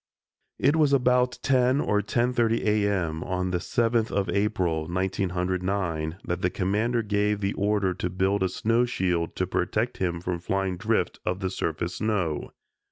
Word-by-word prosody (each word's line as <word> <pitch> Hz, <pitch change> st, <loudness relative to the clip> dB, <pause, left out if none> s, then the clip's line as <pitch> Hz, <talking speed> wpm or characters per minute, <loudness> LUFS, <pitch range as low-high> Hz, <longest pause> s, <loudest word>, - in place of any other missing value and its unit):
It 140 Hz, +4 st, +3 dB
was 150 Hz, -3 st, +3 dB
about 125 Hz, -1 st, +3 dB
ten 130 Hz, 0 st, +3 dB
or 105 Hz, -7 st, +1 dB
ten 120 Hz, +4 st, 0 dB
thirty 115 Hz, -2 st, +1 dB
A. 105 Hz, -1 st, +2 dB
M., 85 Hz, -5 st, -1 dB
on 90 Hz, 0 st, -2 dB
the 90 Hz, -, 0 dB
7th 115 Hz, +3 st, +1 dB
of 100 Hz, -1 st, -1 dB
April, 90 Hz, -6 st, 0 dB
1909, 90 Hz, -2 st, -1 dB
that 90 Hz, +1 st, -2 dB
the 90 Hz, -, +2 dB
Commander 105 Hz, +6 st, 0 dB
gave 105 Hz, 0 st, +1 dB
the 100 Hz, 0 st, -1 dB
order 100 Hz, -2 st, +1 dB
to 90 Hz, 0 st, -3 dB
build 95 Hz, +2 st, 0 dB
a 95 Hz, -, +2 dB
snow 115 Hz, +6 st, +1 dB
shield 90 Hz, -8 st, -1 dB
to 90 Hz, -, 0 dB
protect 105 Hz, +6 st, -1 dB
him 85 Hz, -2 st, -1 dB
from 90 Hz, 0 st, -2 dB
the -, -, -15 dB
flying 95 Hz, -1 st, -1 dB
drift 105 Hz, -2 st, 0 dB
of 90 Hz, +1 st, -1 dB
the 95 Hz, -1 st, -2 dB
surface 85 Hz, 0 st, -3 dB
snow. 100 Hz, -8 st, -1 dB
95 Hz, 170 wpm, -26 LUFS, 90-110 Hz, -, It